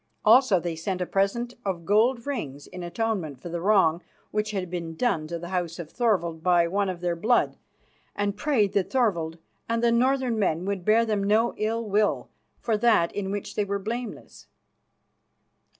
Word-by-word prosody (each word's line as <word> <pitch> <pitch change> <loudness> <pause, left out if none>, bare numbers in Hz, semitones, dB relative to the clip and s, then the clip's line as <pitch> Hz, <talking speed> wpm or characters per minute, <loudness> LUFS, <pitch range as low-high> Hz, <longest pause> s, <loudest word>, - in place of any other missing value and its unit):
Also 250 -8 +6
they 170 -1 -3
sent 180 +3 -3
a 180 - -1
present 200 +7 0
of 180 -4 -3
gold 230 +5 +2
rings 150 - -4
in 180 - -9
atonement 175 - -2
for 175 - -8
the 170 0 -4
wrong 180 -4 +3 0.3
which 210 0 -1
had 195 -3 -3
been 170 -2 -5
done 170 -8 0
to 170 +1 -4
the 170 +1 -8
house 175 -3 -2
of 170 -3 -8
Thorvald 180 -9 0
by 175 -1 +3
one 200 +2 0
of 180 -2 -5
their 175 -1 0
blood, 225 +8 +2 0.6
and 205 0 -1
prayed 215 -6 +1
that 195 -3 +1
Thorvald 170 -11 0 0.3
and 230 0 0
the 235 - +4
northern 250 -1 +2
men 175 -3 0
would 195 -2 -2
bear 220 +4 +4
them 210 -3 0
no 215 +4 +2
ill 225 +2 -1
will 210 +1 +1 0.3
for 225 -3 0
that 210 -7 +3
in 195 -2 -3
which 205 0 -4
they 210 - 0
were 200 0 -2
blameless. 230 +4 -6
200 Hz, 180 wpm, -26 LUFS, 175-225 Hz, 0.6 s, Also